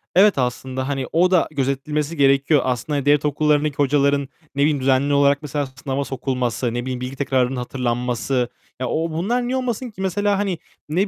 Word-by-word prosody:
Evet, 200 Hz, 0 st, +6 dB
aslında, 130 Hz, +1 st, -2 dB
hani, 135 Hz, -2 st, -2 dB
o 180 Hz, +3 st, +3 dB
da 180 Hz, -3 st, +4 dB
gözetilmesi 145 Hz, +3 st, -2 dB
gerekiyor. 140 Hz, +1 st, +4 dB
Aslında 130 Hz, +3 st, -1 dB
devlet 145 Hz, 0 st, +4 dB
okullarındaki 150 Hz, 0 st, +1 dB
hocaların, 140 Hz, 0 st, +2 dB, 0.3 s
ne 140 Hz, -, 0 dB
bileyim 145 Hz, 0 st, +3 dB
düzenli 135 Hz, +2 st, +2 dB
olarak 140 Hz, 0 st, +4 dB
mesela, 145 Hz, -1 st, -2 dB
sınava 130 Hz, +1 st, -4 dB
sokulması, 125 Hz, -3 st, -2 dB
ne 120 Hz, -, -1 dB
bileyim, 125 Hz, 0 st, -4 dB
bilgi 130 Hz, +1 st, -5 dB
tekrarının 130 Hz, -1 st, +1 dB
hatırlanması. 125 Hz, 0 st, -1 dB, 0.3 s
Ya, 130 Hz, -, -1 dB
ooo, 165 Hz, +5 st, -1 dB
bunlar 230 Hz, +10 st, -1 dB
niye 260 Hz, +1 st, 0 dB
olmasın 250 Hz, -1 st, -2 dB
ki? 200 Hz, -, -9 dB
Mesela, 200 Hz, +2 st, +1 dB
hani, 195 Hz, -3 st, -1 dB, 0.3 s
ne 180 Hz, +7 st, +1 dB
140 Hz, 175 wpm, -21 LUFS, 130-155 Hz, 0.3 s, Evet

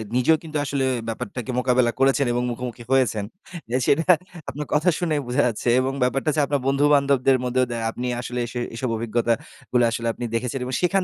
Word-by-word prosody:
নিজেও 140 Hz, +6 st, +4 dB
কিন্তু 155 Hz, -1 st, -4 dB
আসলে 135 Hz, -1 st, 0 dB, 0.2 s
ব্যাপারটাকে 115 Hz, +2 st, -4 dB
মোকাবেলা 125 Hz, -1 st, +2 dB
করেছেন 135 Hz, +1 st, +3 dB
এবং 120 Hz, 0 st, 0 dB
মুখোমুখি 120 Hz, 0 st, -6 dB
হয়েছেন। 115 Hz, -6 st, +2 dB, 0.4 s
অ্যা 125 Hz, -, +1 dB
সেটা 165 Hz, +5 st, +2 dB, 0.4 s
আপনার 150 Hz, +2 st, -5 dB
কথা 155 Hz, +4 st, +3 dB
শুনেই 155 Hz, -5 st, 0 dB
বোঝা 125 Hz, -, +2 dB
যাচ্ছে। 120 Hz, +1 st, -1 dB
এবং 135 Hz, +1 st, -1 dB
ব্যাপারটা 135 Hz, +4 st, +1 dB
হচ্ছে -, -, +1 dB
আপনার 140 Hz, -1 st, -1 dB
বন্ধু-বান্ধবদের 140 Hz, -2 st, +3 dB
মধ্যেও 125 Hz, +1 st, +1 dB
দ্যা 115 Hz, -, -2 dB
আপনি 125 Hz, +2 st, -4 dB
আসলে 125 Hz, 0 st, -4 dB
সে 120 Hz, -, -4 dB, 0.2 s
এসব 125 Hz, +2 st, -2 dB
অভিজ্ঞতা 115 Hz, +1 st, +1 dB, 0.4 s
গুলা 120 Hz, -1 st, +4 dB
আসলে 115 Hz, 0 st, -2 dB
আপনি 120 Hz, -, -8 dB
দেখেছেন। 125 Hz, +3 st, -2 dB
এবং 130 Hz, -, -5 dB
সেখান 190 Hz, +2 st, +2 dB
130 Hz, 185 wpm, -23 LUFS, 120-140 Hz, 0.4 s, নিজেও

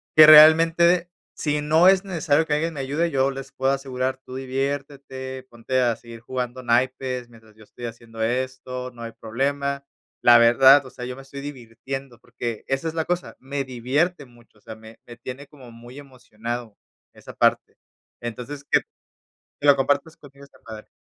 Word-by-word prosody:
que 155 Hz, 0 st, +10 dB
realmente, 165 Hz, +3 st, +7 dB, 0.3 s
si 150 Hz, -1 st, -1 dB
no 160 Hz, +4 st, +4 dB
es 190 Hz, 0 st, +5 dB
necesario 160 Hz, -4 st, +1 dB
que 150 Hz, -, -2 dB
alguien 165 Hz, +2 st, -1 dB
me 140 Hz, -, -4 dB
ayude, 145 Hz, +6 st, -1 dB
yo 135 Hz, -2 st, +1 dB
les 135 Hz, 0 st, -8 dB
puedo 135 Hz, 0 st, 0 dB
asegurar, 130 Hz, -1 st, -3 dB
tú 130 Hz, -, -9 dB
diviértete, 135 Hz, -1 st, -5 dB
ponte 120 Hz, +2 st, -2 dB
a 120 Hz, -2 st, +1 dB
seguir 115 Hz, 0 st, -12 dB
jugando 125 Hz, +1 st, -5 dB
naipes 125 Hz, +1 st, -1 dB
mientras 110 Hz, -2 st, -19 dB
yo 110 Hz, -, -17 dB
estoy 120 Hz, +3 st, -11 dB
haciendo 115 Hz, -1 st, -9 dB
esto, 125 Hz, +1 st, -3 dB
no 120 Hz, -1 st, -14 dB
hay 115 Hz, -1 st, -7 dB
problema. 140 Hz, +5 st, -3 dB, 0.4 s
La 120 Hz, 0 st, +7 dB
verdad, 130 Hz, +4 st, +6 dB
o -, -, -10 dB
sea, 125 Hz, -, -8 dB
yo 125 Hz, 0 st, -6 dB
me 135 Hz, -, -11 dB
estoy 140 Hz, +1 st, -9 dB
divirtiendo, 135 Hz, -1 st, -8 dB
porque 120 Hz, -2 st, -6 dB
esa 135 Hz, +4 st, -2 dB
es 160 Hz, -, -3 dB
la 160 Hz, -1 st, -2 dB
cosa, 180 Hz, 0 st, -3 dB
me 140 Hz, +1 st, -4 dB
divierte 135 Hz, +6 st, -1 dB
mucho, 120 Hz, -3 st, -23 dB
o -, -, -32 dB
sea, 110 Hz, -, -10 dB
me 110 Hz, 0 st, -15 dB
me 120 Hz, -1 st, -11 dB
tiene 130 Hz, +4 st, -9 dB
como 130 Hz, -5 st, -15 dB
muy 120 Hz, +3 st, -13 dB
emocionado 120 Hz, -4 st, -8 dB, 0.4 s
esa -, -, -12 dB
parte. -, -, +1 dB, 0.5 s
Entonces, 125 Hz, +5 st, -7 dB
que -, -, +4 dB, 0.8 s
que 145 Hz, -, 0 dB
lo 140 Hz, -, +7 dB
compartas 145 Hz, +4 st, 0 dB
contigo 140 Hz, -1 st, -16 dB
esta 140 Hz, -, -21 dB
padre. 110 Hz, -1 st, -10 dB
130 Hz, 180 wpm, -23 LUFS, 120-145 Hz, 0.8 s, que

